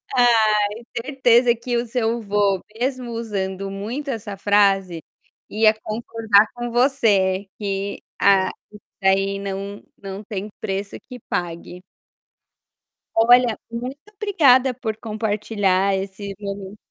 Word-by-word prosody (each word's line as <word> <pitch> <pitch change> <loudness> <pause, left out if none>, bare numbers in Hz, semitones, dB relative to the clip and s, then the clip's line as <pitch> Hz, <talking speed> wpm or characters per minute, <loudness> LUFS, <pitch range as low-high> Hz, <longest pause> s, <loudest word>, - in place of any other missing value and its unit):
Ai, 235 -3 +5 0.5
certeza 245 -2 +3
que 240 +1 -3
o 235 +1 -1
seu 230 0 -1
vô, 200 -2 +1 0.2
mesmo 255 -1 -2
usando 195 -4 -3
muito 230 +9 -5
essa 205 -4 -5
frase, 195 -3 +2 0.5
ia 215 0 +4
concordar 220 -1 +2
com 240 0 -4
você 210 -7 +2
que 200 -1 -3 0.2
a 195 -2 +5 0.2
isso 210 - -13 0.2
daí 195 +1 +2
não 200 +1 -5 0.2
não 195 +1 -7
tem 205 0 -5
preço 195 +1 -4
que 250 - -7
pague. 175 +1 -4 1.3
Olha, 240 0 +5
muito 245 +3 -5 0.2
obrigada 275 - +4
por 225 -3 -4
compartilhar 210 -3 0
esse 195 +1 -5
momen 200 0 -6
210 Hz, 115 wpm, -22 LUFS, 195-235 Hz, 1.3 s, Ai